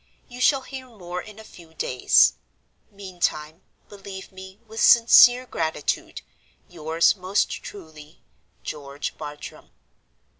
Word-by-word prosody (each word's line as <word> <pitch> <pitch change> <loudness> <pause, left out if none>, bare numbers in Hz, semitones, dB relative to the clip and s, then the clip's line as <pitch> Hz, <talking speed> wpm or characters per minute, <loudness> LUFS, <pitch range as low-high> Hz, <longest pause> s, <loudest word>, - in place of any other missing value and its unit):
You 245 0 -10
shall 270 +1 +3
hear 260 -1 -9
more 180 -6 -7
in 210 +2 -13
a 220 - -11
few 170 -6 -17
days. 125 -4 +3 0.6
Meantime, 175 -5 -4 0.3
believe 195 -1 -11
me, 190 +1 -12
with 220 0 -7
sincere 245 +2 +7
gratitude, 160 - -3 0.4
"Yours 165 +1 +1
most 190 +1 -1
truly, 155 -5 -13 0.4
"GEORGE 140 - -6
BARTRAM." 150 -1 -10
185 Hz, 110 wpm, -23 LUFS, 160-215 Hz, 0.6 s, sincere